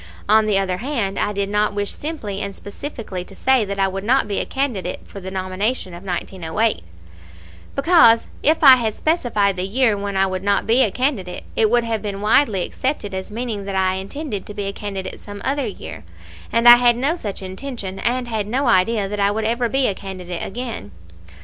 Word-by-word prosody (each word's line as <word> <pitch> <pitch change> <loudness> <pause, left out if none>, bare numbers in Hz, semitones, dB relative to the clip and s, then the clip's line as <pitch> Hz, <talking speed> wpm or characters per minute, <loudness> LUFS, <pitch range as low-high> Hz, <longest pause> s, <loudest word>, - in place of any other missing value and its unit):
On 215 +1 +5
the 205 -2 +2
other 190 -2 0
hand, 230 -5 -2
I 210 - 0
did 200 -1 -1
not 210 0 0
wish 205 0 -1
simply 220 -11 -4
and 200 -1 -4
specifically 205 -4 -6
to - - -14
say 265 -3 +3
that 200 0 -4
I 195 0 +3
would 195 0 -4
not 255 +5 +2
be 200 - -1
a - - -3
candidate 230 -10 -2
for 200 - -10
the 190 0 -7
nomination 190 +2 -2
in 175 +2 -9
1908, 190 +3 -1 0.9
because 275 -7 +5 0.2
if 315 +2 +2
I 265 -3 +10
had 225 -3 -1
specified 225 - +1
the 180 - -1
year 230 +1 +2
when 200 -1 -3
I 190 - +4
would 185 -1 -3
not 200 +1 +1
be 230 +4 +4
a 220 - +4
candidate, 205 -7 -2
it 220 -1 +3
would 240 +1 +3
have 225 -2 -2
been 200 -2 -4
widely 210 -2 +3
accepted 255 -7 -3
as 190 0 -4
meaning 220 -3 -4
that 195 -1 -4
I 190 -1 +2
intended 205 +4 -5
to 210 - -8
be 205 - -3
a 195 - -3
candidate 195 -2 -5
some 205 0 -9
other 275 -2 0
year; 200 - -8 0.5
and 230 +1 +3
I 240 0 +12
had 240 -1 +4
no 280 +7 +1
such 205 - -5
intention, 195 -1 -6
and 245 +1 0
had 220 -3 -2
no 260 +6 0
idea 195 +2 +3
that 205 +1 -4
I 200 0 +3
would 215 +1 -1
ever 235 +1 0
be 270 +1 +1
a 205 - +1
candidate 185 -3 -6
again. 230 - -5
210 Hz, 210 wpm, -21 LUFS, 195-245 Hz, 0.9 s, I